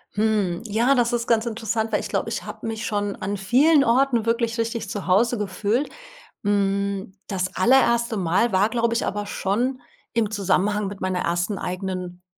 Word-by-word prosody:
Hm, 205 -4 +1
ja, 235 +5 +2
das 240 0 +2
ist 235 -1 -1
ganz 230 0 +2
interessant, 225 0 -2
weil - - +2
ich - - -6
glaube, - - -1
ich - - -3
habe - - -8
mich 225 0 -3
schon 205 -2 -1
an 200 +2 -3
vielen 275 +10 +4
Orten 240 -1 +2
wirklich 230 0 0
richtig 230 0 -2
zu 205 - -4
Hause 230 +6 +3
gefühlt. 210 +6 -1 0.5
Hm, 200 -1 0
das 185 -2 -3
allererste 235 +1 +3
Mal 190 +6 +1
war, 195 +3 +3
glaube 235 -1 0
ich, - - 0
aber 205 +1 -3
schon 245 +7 -1 0.3
im 220 -2 +1
Zusammenhang 205 +1 +1
mit 195 0 -7
meiner 185 -1 -1
ersten 175 +4 -1
eigenen 180 -1 -5
210 Hz, 175 wpm, -23 LUFS, 195-235 Hz, 0.5 s, vielen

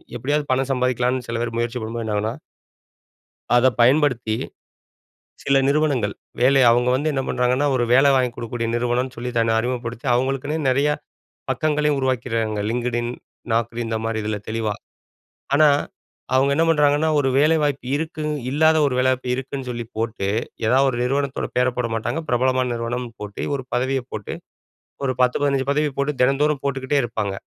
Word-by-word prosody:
எப்படியாவது 145 +5 -1
பணம் 130 +1 +1
சம்பாதிக்கலான்னு 125 -1 0
சில 115 - -2
பேர் 115 -1 -3
முயற்சி 120 +1 -1
பண்ணும்போது, 115 +1 -4
என்னாகுன்னா 105 +1 -1 1.2
அத 120 +1 +5
பயன்படுத்தி 125 -3 +3 1.1
சில 140 0 +2
நிறுவனங்கள் 140 -8 +1 0.3
வேலை 135 +2 +5
அவுங்க 120 +1 +3
வந்து 145 +4 +1
என்ன 135 - 0
பண்றாங்கன்னா, 125 +3 +1
ஒரு 125 - +1
வேலை 135 +2 +6
வாங்கிக் 125 -2 +1
குடுக்கக்கூடிய 115 0 -4
நிறுவனன்னு 125 +2 -1
சொல்லி 125 +2 -4
தன்னை 115 0 +2
அறிமுகப்படுத்தி, 120 0 -4
அவங்களுக்குன்னே 135 +4 0
நிறைய 140 +3 +2 0.6
பக்கங்களையும் 150 -1 +1
உருவாக்கிறாங்க 115 -5 -1
LinkedIn, 120 0 -1 0.4
Naukri 115 +1 0
இந்த 115 - -2
மாரி 115 -1 -1
இதில 105 0 -2
தெளிவா. 110 -2 -1 0.8
ஆனா, 155 +1 +6 0.7
அவுங்க 135 +2 +3
என்ன 165 - +3
பண்றாங்கன்னா, 150 0 +3
ஒரு 135 - +1
வேலைவாய்ப்பு 150 -3 +2
இருக்கு. 155 0 -4 0.3
இல்லாத 160 +3 +4
ஒரு 130 - -1
வேலை 130 0 +3
வாய்ப்பு 125 -1 -3
இருக்குன்னு 135 0 -5
சொல்லி 120 -1 -4
போட்டு, 110 -3 -2 0.4
எதாவது 135 +4 +4
ஒரு 120 - -4
நிறுவனத்தோட 135 +1 -1
பேர 125 0 +3
போட 120 -2 0
மாட்டாங்க, 115 +8 -2
பிரபலமான 130 +1 +1
நிறுவனம்ன்னு 120 +1 -4
போட்டு, 100 -1 -6
ஒரு 130 - -7
பதவிய 130 +1 0
போட்டு, 105 -2 -5 0.7
ஒரு 130 - 0
10 125 0 +3
15 140 -1 +1
பதவி 150 +1 +1
போட்டு 140 +2 0
தினந்தோறும் 140 +2 +2
போட்டுக்கிட்டே 140 +1 0
இருப்பாங்க. 110 -4 -2
125 Hz, 150 wpm, -22 LUFS, 120-140 Hz, 1.2 s, வேலை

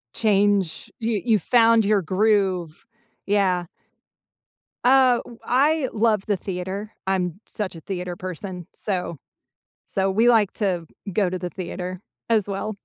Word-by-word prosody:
Change, 205 -5 +1
you 225 -4 -1
you 225 -3 +4
found 230 +3 +4
your 205 -1 +3
groove. 185 -2 +1 0.4
Yeah. 190 -3 +2 1.2
Uh, 255 -1 +5
w 235 - -13
I 280 +2 +2
love 215 -2 +2
the 205 -2 +1
theater, 190 +3 -5 0.2
I'm 185 -2 0
such 195 -4 -4
a - - -8
theater 180 0 -5
person, 180 0 -6
so 180 -5 -3 0.7
so 195 0 0
we 220 +5 +3
like 220 -5 +4
to 180 -6 -1 0.3
go 200 0 +2
to 185 +1 -3
the 180 0 -4
theater, 185 0 -5 0.3
as 215 -3 +2
well. 200 +2 -3
200 Hz, 135 wpm, -23 LUFS, 180-220 Hz, 1.2 s, Uh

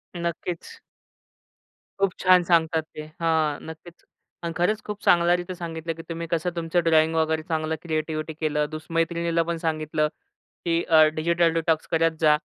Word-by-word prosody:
नक्कीच. 170 - -5 1.2
खूप 195 -2 +2
छान 185 -1 +6
सांगतात 165 -2 +2
ते. - - -5 0.2
हां 160 -3 +1
नक्कीच 160 +2 -11 0.4
आणि 170 -1 -3
खरंच 210 +5 +1
खूप 210 -1 -6
चांगल्यारीती 175 +1 +3
सांगितलं, 165 -1 -5
की 165 - -9
तुम्ही 165 0 -4
कसं 170 +1 0
तुमचं 170 +1 0
ड्रॉईंग 160 0 +3
वगैरे 160 0 +1
चांगलं 160 0 -1
क्रिएटिविटी 155 -1 -3
केलं. 150 -1 0
दुस 155 0 -7
मैत्रिणीला 170 0 +1
पण 170 - -1
सांगितलं 155 -1 0 0.6
की 170 0 +1
अ, 160 -2 +6
डिजिटल 170 +1 +2
डिटॉक्स 165 -1 0
करत 165 0 +2
जा 150 -1 +6
165 Hz, 150 wpm, -25 LUFS, 160-170 Hz, 1.2 s, छान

